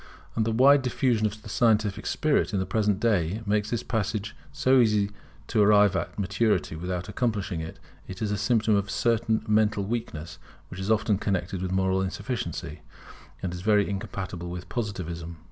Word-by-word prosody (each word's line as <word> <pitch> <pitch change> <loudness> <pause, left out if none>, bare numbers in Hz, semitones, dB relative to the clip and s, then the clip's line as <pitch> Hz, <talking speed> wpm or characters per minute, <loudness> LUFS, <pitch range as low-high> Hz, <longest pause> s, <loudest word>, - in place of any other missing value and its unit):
And 110 - +1
the - - +1
wide 135 +5 +6
diffusion 125 -3 +1
of 105 +1 -8
the - - -10
scientific 110 -1 +1
spirit 150 -7 +1
in - - +1
the 95 - -1
present 105 0 +1
day 105 -2 +1
makes 105 0 0
this 120 0 -2
passage 105 -2 -2 0.2
so 130 0 +3
easy 105 -4 +4
that 100 - -9 0.4
to 110 - +2
arrive 105 -2 +5
at 85 - -3
maturity 100 -2 0
without 90 +2 -4
accomplishing 105 -8 -1
it, 80 - -7 0.3
is 95 +3 -3
a - - +1
symptom 110 +1 +2
of 100 0 0
a - - -12
certain 110 +2 +1
mental 105 -1 +2
weakness, 85 -7 -5 0.3
which 90 - -8
is 95 +2 -3
often 110 -2 +2
connected 95 -2 -2
with 95 -1 -2
moral 95 0 +1
insufficiency, 100 -1 -4 0.6
and 90 -2 -2
is 90 - -6
very 105 0 +3
incompatible 95 -3 -5
with 90 0 -6
Positivism. 85 -7 -4
105 Hz, 180 wpm, -26 LUFS, 95-110 Hz, 0.6 s, wide